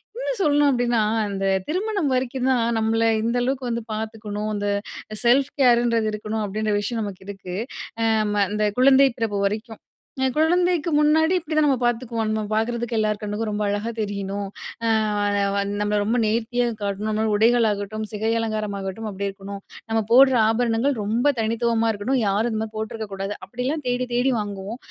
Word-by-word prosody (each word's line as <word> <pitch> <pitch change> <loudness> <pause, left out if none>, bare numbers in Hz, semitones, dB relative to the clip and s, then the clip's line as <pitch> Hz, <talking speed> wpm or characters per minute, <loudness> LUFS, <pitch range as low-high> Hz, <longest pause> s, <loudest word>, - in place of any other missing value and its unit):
இன்னும் - - -3
சொல்லணும் 290 -3 +4
அப்பிடின்னா, 240 -3 +2 0.3
"அந்த 195 -1 -3 0.2
திருமணம் 385 -1 -1
வரைக்கும் 255 0 -1
தான் 235 -2 +1
நம்மள 225 +1 +1 0.2
இந்த 235 +2 0
அளவுக்கு 255 -1 -1
வந்து 235 -1 -2
பார்த்துக்கணும், 215 -1 -4
அந்த 205 0 -2 0.6
செல்ஃப் 265 +3 +4
கேர் 240 -2 +5
ன்றது 230 -2 +1
இருக்கணும்." 215 +1 -3
அப்படின்ற 210 +1 -1
விஷயம் 225 +2 -2
நமக்கு 195 -2 -7
இருக்கு. 185 -2 -7 0.5
அ - - +2 0.2
அம் 210 0 -1
அந்த 210 0 0
குழந்தை 270 +1 +6
பிறப்பு 220 -4 -1
வரைக்கும். 220 +2 -6 0.4
அ - - +3
குழந்தைக்கு 345 +1 +2
முன்னாடி 315 +3 +4
இப்படிதான் 310 -2 +1
நம்ம 270 -2 +3
பார்த்துக்குவோம். 235 -2 -1
நம்ம 215 - 0
பாக்கறதுக்கு 235 +2 -1
எல்லார் 215 -1 0
கண்ணுக்கும் 210 +1 -3
ரொம்ப 210 0 -2
அழகா 205 +3 -1
தெரியணும். 200 -1 -3 0.4
அ - - +2 0.3
வா 205 - 0 0.3
வ 200 - +1 0.2
நம்மள 210 0 +1
ரொம்ப 225 +4 0
நேர்த்தியா 235 +3 0 0.2
காட்டணும். 200 +1 -2
இந்தமாரி 215 0 0
உடைகளாகட்டும், 215 -2 +2
சிகை 220 +1 -2
அலங்காரமாகட்டும், 215 -1 -3
அப்படி 200 0 -4
இருக்கணும். 195 0 -8 0.3
நம்ம 225 0 +2
போடுற 260 +2 +7
ஆபரணங்கள் 235 +4 +1
ரொம்ப 225 +5 0
தனித்துவமா 230 0 +1
இருக்கணும், 245 +6 0
யாரும் 210 +4 +1
இந்தமாரி 220 0 -3
போட்டுருக்க 220 0 -4
கூடாது. 195 +1 -3
அப்படிலாம் 255 +6 -3
தேடி, 245 +1 0
தேடி 250 +2 +2
வாங்குவோம். 205 +1 -5
225 Hz, 160 wpm, -23 LUFS, 210-250 Hz, 0.6 s, போடுற